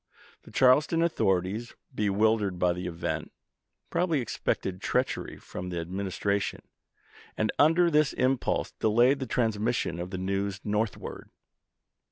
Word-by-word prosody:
The -, -, -16 dB
Charleston 150 Hz, +6 st, +4 dB
authorities, 100 Hz, -, 0 dB, 0.2 s
bewildered 105 Hz, -2 st, +1 dB
by 90 Hz, 0 st, +2 dB
the 90 Hz, +1 st, -5 dB
event, 85 Hz, -1 st, -3 dB, 0.6 s
probably 170 Hz, -3 st, +1 dB
suspected 95 Hz, -4 st, -2 dB
treachery -, -, -1 dB
from 90 Hz, 0 st, -7 dB
the 90 Hz, -, -4 dB
Administra 95 Hz, +3 st, -1 dB
tion, -, -, -4 dB, 0.7 s
and, 110 Hz, -, +1 dB
under 165 Hz, +3 st, +5 dB
this 150 Hz, -1 st, +3 dB
impulse, 130 Hz, 0 st, 0 dB
delayed 120 Hz, +6 st, +3 dB
the 130 Hz, -, -4 dB
transmis 115 Hz, 0 st, 0 dB
sion 85 Hz, -6 st, -2 dB
of 90 Hz, +1 st, -4 dB
the 95 Hz, -, -4 dB
news 95 Hz, +1 st, -2 dB
northward. 105 Hz, 0 st, -3 dB
105 Hz, 130 wpm, -28 LUFS, 95-130 Hz, 0.7 s, under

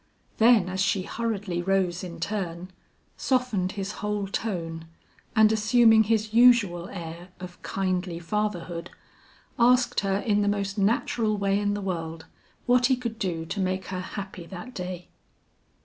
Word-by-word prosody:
Then 225 Hz, -4 st, +6 dB
as 185 Hz, +1 st, -4 dB
she 195 Hz, -1 st, +1 dB
hurriedly 205 Hz, -6 st, -3 dB
rose 185 Hz, -1 st, 0 dB
in 170 Hz, -2 st, -7 dB
turn, 180 Hz, -2 st, -4 dB, 0.5 s
softened 240 Hz, -8 st, 0 dB
his 195 Hz, 0 st, -4 dB
whole 210 Hz, -1 st, -1 dB
tone, 165 Hz, -6 st, -4 dB, 0.5 s
and 220 Hz, -1 st, +6 dB
assuming 220 Hz, 0 st, +5 dB
his 215 Hz, 0 st, 0 dB
usual 225 Hz, -7 st, +5 dB
air 170 Hz, 0 st, -8 dB
of 180 Hz, -1 st, -10 dB
kindly 185 Hz, -2 st, -2 dB
fatherhood, 175 Hz, -2 st, -3 dB, 0.7 s
asked 250 Hz, +1 st, +4 dB
her 195 Hz, -1 st, 0 dB
in 205 Hz, 0 st, +1 dB
the 205 Hz, -, +1 dB
most 200 Hz, -1 st, -1 dB
natural 215 Hz, +1 st, +1 dB
way 200 Hz, 0 st, +1 dB
in 205 Hz, 0 st, 0 dB
the 205 Hz, -, -4 dB
world, 165 Hz, -4 st, -4 dB, 0.4 s
what 245 Hz, 0 st, +4 dB
he 260 Hz, -, +3 dB
could 235 Hz, -3 st, -5 dB
do 170 Hz, -4 st, -2 dB
to 200 Hz, -, -5 dB
make 185 Hz, 0 st, -1 dB
her 185 Hz, -1 st, -3 dB
happy 185 Hz, -2 st, -7 dB
that 195 Hz, +8 st, -9 dB
day. 180 Hz, -3 st, -6 dB
195 Hz, 150 wpm, -26 LUFS, 180-220 Hz, 0.7 s, Then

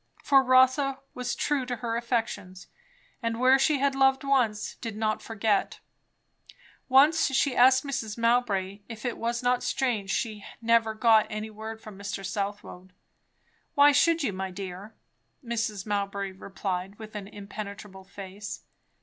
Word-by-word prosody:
For 270 Hz, -1 st, +5 dB
Rotha 260 Hz, +1 st, +4 dB, 0.2 s
was 250 Hz, -1 st, -3 dB
true 290 Hz, -3 st, 0 dB
to 250 Hz, -, -2 dB
her 230 Hz, -1 st, -3 dB
affections; 225 Hz, -6 st, -3 dB, 0.6 s
and 230 Hz, -1 st, -2 dB
where 260 Hz, +2 st, +5 dB
she 290 Hz, +2 st, +3 dB
had 275 Hz, 0 st, +1 dB
loved 270 Hz, 0 st, +3 dB
once, 245 Hz, -6 st, +1 dB
did 225 Hz, -3 st, -6 dB
not 215 Hz, 0 st, -1 dB
forget 220 Hz, -2 st, -1 dB, 1.1 s
Once 290 Hz, +5 st, +5 dB
she 270 Hz, -1 st, +1 dB
asked 260 Hz, +1 st, +6 dB
Mrs. 225 Hz, -6 st, -4 dB
Mowbray 220 Hz, -5 st, +1 dB
if 225 Hz, 0 st, -8 dB
it 245 Hz, -, -1 dB
was 235 Hz, +1 st, -2 dB
not 245 Hz, 0 st, +2 dB
strange 225 Hz, -7 st, -1 dB
she 215 Hz, -2 st, -2 dB, 0.2 s
never 230 Hz, -1 st, +2 dB
got 220 Hz, -1 st, +4 dB
any 215 Hz, 0 st, -5 dB
word 220 Hz, +1 st, -7 dB
from 210 Hz, -3 st, -12 dB
Mr. 200 Hz, -1 st, -5 dB
Southwode? 195 Hz, -2 st, -5 dB, 0.8 s
"Why 285 Hz, +1 st, +7 dB
should 330 Hz, +3 st, +3 dB
you, 210 Hz, -, -1 dB
my 190 Hz, 0 st, -4 dB
dear?" 190 Hz, +3 st, -8 dB, 0.5 s
Mrs. 225 Hz, -4 st, -2 dB
Mowbray 200 Hz, -1 st, -2 dB
replied, 190 Hz, 0 st, -5 dB
with 220 Hz, -1 st, -10 dB
an 205 Hz, -2 st, -6 dB
impenetrable 200 Hz, -1 st, -8 dB
face. 195 Hz, +1 st, -8 dB
220 Hz, 145 wpm, -27 LUFS, 200-255 Hz, 1.1 s, Why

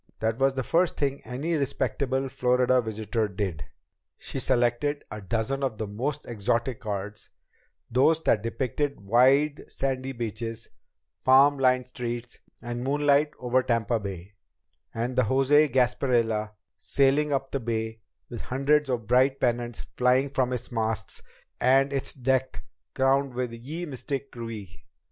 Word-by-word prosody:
That 110 Hz, +2 st, -1 dB
was 135 Hz, 0 st, +3 dB
the 130 Hz, -, -1 dB
first 170 Hz, +7 st, +1 dB
thing 140 Hz, -1 st, -1 dB
any 140 Hz, +7 st, -3 dB
respectable 135 Hz, -1 st, -1 dB
Florida 125 Hz, 0 st, +2 dB
visitor 110 Hz, 0 st, -2 dB
did! 95 Hz, -, -4 dB, 0.5 s
She -, -, -5 dB
selected 125 Hz, +3 st, +1 dB
a 105 Hz, -, -6 dB
dozen 115 Hz, +7 st, -2 dB
of 130 Hz, -5 st, -1 dB
the 110 Hz, -, -3 dB
most 130 Hz, +9 st, -3 dB
exotic 115 Hz, +3 st, -1 dB
cards, 105 Hz, -2 st, -5 dB, 0.6 s
those 145 Hz, +7 st, +4 dB
that 105 Hz, -, +3 dB
depicted 130 Hz, +5 st, -2 dB
wide 135 Hz, +8 st, +3 dB
sandy 135 Hz, -1 st, -2 dB
beaches, 115 Hz, -1 st, -5 dB, 0.5 s
palm 135 Hz, +2 st, +6 dB
lined 130 Hz, -1 st, +3 dB
streets, 120 Hz, -1 st, -5 dB, 0.2 s
the 120 Hz, +1 st, -5 dB
moonlight 145 Hz, +4 st, +2 dB
over 125 Hz, +1 st, +1 dB
Tampa 115 Hz, -1 st, 0 dB
Bay, 100 Hz, -1 st, -7 dB, 0.6 s
and 120 Hz, +2 st, -3 dB
the 130 Hz, -, +4 dB
José 135 Hz, +5 st, +3 dB
Gasparilla 120 Hz, -4 st, +1 dB, 0.3 s
sailing 140 Hz, +2 st, +2 dB
up 135 Hz, -1 st, -1 dB
the 140 Hz, -, -1 dB
Bay 110 Hz, -1 st, -3 dB, 0.3 s
with 120 Hz, -, -7 dB
hundreds 140 Hz, +2 st, +1 dB
of 120 Hz, -4 st, -1 dB
bright 130 Hz, +4 st, +3 dB
pennants 120 Hz, -1 st, -1 dB, 0.2 s
flying 125 Hz, +2 st, +3 dB
from 130 Hz, -2 st, 0 dB
its 125 Hz, 0 st, -4 dB
masts 110 Hz, -2 st, -2 dB, 0.4 s
and 135 Hz, +2 st, +3 dB
its 135 Hz, -, 0 dB
deck 130 Hz, 0 st, -1 dB, 0.3 s
crowded 135 Hz, 0 st, +2 dB
with 125 Hz, -2 st, -2 dB
Ye 145 Hz, +9 st, -6 dB
Mystic 140 Hz, -1 st, -4 dB
Krewe. 110 Hz, -6 st, -8 dB
125 Hz, 140 wpm, -26 LUFS, 115-135 Hz, 0.6 s, palm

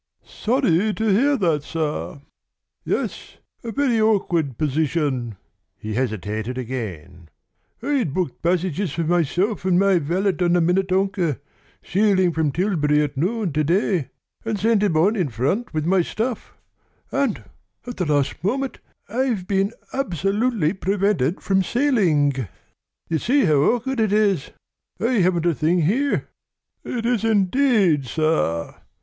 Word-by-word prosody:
"Sorry 215 Hz, -, +1 dB
to 220 Hz, -, -1 dB
hear 270 Hz, +8 st, +3 dB
that, 165 Hz, -, +1 dB
sir." 150 Hz, -2 st, -4 dB, 0.6 s
"Yes, -, -, -3 dB, 0.3 s
a 230 Hz, -, -4 dB
very 250 Hz, -4 st, +1 dB
awkward 175 Hz, -, +1 dB
position." 145 Hz, -5 st, -1 dB, 0.4 s
He 110 Hz, 0 st, -6 dB
hesitated 110 Hz, 0 st, -3 dB
again. 100 Hz, -10 st, -6 dB, 0.5 s
"I'd 270 Hz, -, 0 dB
booked 175 Hz, -3 st, -3 dB
passages 180 Hz, 0 st, 0 dB
for 165 Hz, -, -1 dB
myself 175 Hz, +6 st, 0 dB
and 185 Hz, -1 st, +2 dB
my 195 Hz, -1 st, +4 dB
valet 185 Hz, +6 st, 0 dB
on 175 Hz, -1 st, +3 dB
the 175 Hz, -, +4 dB
Minnetonka, 185 Hz, -2 st, +1 dB, 0.4 s
sailing 190 Hz, -3 st, +2 dB
from 155 Hz, -2 st, 0 dB
Tilbury 150 Hz, -5 st, +1 dB
at 145 Hz, -1 st, -4 dB
noon 185 Hz, -, -1 dB
to 155 Hz, +1 st, +1 dB
day, 170 Hz, -, +1 dB, 0.3 s
and 225 Hz, -2 st, -2 dB
sent 220 Hz, +1 st, +2 dB
him 195 Hz, -7 st, +1 dB
on 195 Hz, +8 st, +3 dB
in 180 Hz, -9 st, 0 dB
front 140 Hz, -, -1 dB
with 155 Hz, -1 st, -2 dB
my 185 Hz, +2 st, +3 dB
stuff, 225 Hz, +6 st, -4 dB, 0.5 s
and 275 Hz, -6 st, -1 dB, 0.4 s
at 245 Hz, -1 st, -7 dB
the 180 Hz, -, -1 dB
very 150 Hz, -2 st, +2 dB
last 140 Hz, +2 st, -2 dB
moment 265 Hz, +7 st, -1 dB, 0.3 s
I've 235 Hz, -4 st, -1 dB
been 195 Hz, +1 st, 0 dB, 0.2 s
absolutely 200 Hz, -, 0 dB
prevented 190 Hz, -5 st, 0 dB
from 190 Hz, -1 st, +2 dB
sailing! 190 Hz, -, +2 dB, 0.7 s
You 160 Hz, -1 st, -1 dB
see 270 Hz, -, +2 dB
how 155 Hz, -4 st, +3 dB
awkward 245 Hz, -, +1 dB
it 215 Hz, -3 st, +2 dB
is! 205 Hz, -8 st, +2 dB, 0.5 s
I 235 Hz, 0 st, +1 dB
haven't 175 Hz, -2 st, +2 dB
a 170 Hz, -, +3 dB
thing 165 Hz, +3 st, +1 dB
here." 265 Hz, -, 0 dB, 0.6 s
"It 235 Hz, -2 st, -4 dB
is 240 Hz, -2 st, +1 dB
indeed, 205 Hz, -, +2 dB
sir! 155 Hz, -, 0 dB
185 Hz, 140 wpm, -22 LUFS, 155-215 Hz, 0.7 s, my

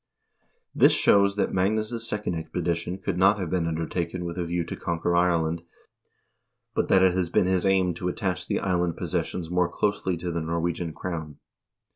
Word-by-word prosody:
l -, -, -46 dB, 0.2 s
This -, -, +7 dB
shows 100 Hz, 0 st, +4 dB
that 105 Hz, -, 0 dB
Magnus' 110 Hz, +4 st, 0 dB
second 105 Hz, -3 st, -2 dB
expedition 85 Hz, +2 st, -2 dB
could 95 Hz, -1 st, -3 dB
not 95 Hz, +2 st, +5 dB
have 90 Hz, -5 st, -4 dB
been 90 Hz, -3 st, 0 dB
undertaken 85 Hz, +2 st, -3 dB
with 85 Hz, -1 st, -4 dB
a 85 Hz, -, -1 dB
view 85 Hz, +1 st, -1 dB
to 85 Hz, -, -6 dB
conquer 85 Hz, 0 st, -1 dB
Ireland, 85 Hz, -2 st, +2 dB, 1.1 s
but -, -, 0 dB
that 95 Hz, -1 st, +5 dB
it 95 Hz, -1 st, +5 dB
has 90 Hz, -2 st, 0 dB
been 90 Hz, -, +2 dB
his 95 Hz, +1 st, +1 dB
aim 95 Hz, -2 st, +3 dB
to 90 Hz, +2 st, -4 dB
attach 90 Hz, -1 st, -2 dB
the -, -, -1 dB
island 90 Hz, -3 st, 0 dB
possessions 85 Hz, -2 st, -3 dB
more 90 Hz, -1 st, +2 dB
closely 95 Hz, -1 st, -1 dB
to 85 Hz, +1 st, -4 dB
the 85 Hz, 0 st, -2 dB
Norwegian 85 Hz, +1 st, -2 dB
crown. 80 Hz, -3 st, -5 dB
90 Hz, 180 wpm, -26 LUFS, 85-95 Hz, 1.1 s, This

